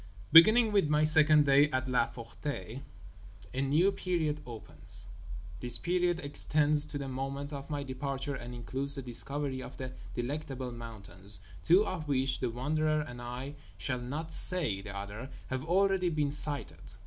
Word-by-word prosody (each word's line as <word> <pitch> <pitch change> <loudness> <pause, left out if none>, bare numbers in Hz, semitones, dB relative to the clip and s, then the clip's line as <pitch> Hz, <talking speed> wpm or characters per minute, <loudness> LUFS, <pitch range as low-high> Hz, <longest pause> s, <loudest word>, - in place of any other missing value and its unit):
Beginning 215 +8 +8
with 195 -7 +3
my 150 0 +3
second 155 -1 +5
day 140 +2 +5
at 130 -1 -1
La 125 -2 +2
Ferté 120 -1 -6 0.7
a 130 - -1
new 155 +8 +3
period 165 -6 -1
opens. 100 -3 -5 0.5
This 120 +4 +2
period 175 +3 0
extends 150 +1 +2
to 150 -1 -5
the 140 -1 -5
moment 135 +2 -4
of 140 +1 -7
my 145 -2 -2
departure 135 +1 -4
and 125 -2 -7
includes 135 +3 -3
the 135 - -5
discovery 130 +2 -3
of - - -9
The 130 -1 -5 0.2
Delectable 130 0 -4
Mountains, 105 -4 -4 0.2
two 185 +6 +5
of 160 -4 -4
which—The 130 -2 0
Wanderer 155 +5 0
and 120 -5 -8
I 125 +4 -6 0.2
shall 125 -2 -2
not 150 +6 -5
say 155 - +4
the 100 0 -7
other—have 120 +6 -6
already 190 +1 +2
been 150 -3 0
sighted. 140 - -3
140 Hz, 150 wpm, -31 LUFS, 125-155 Hz, 0.7 s, Beginning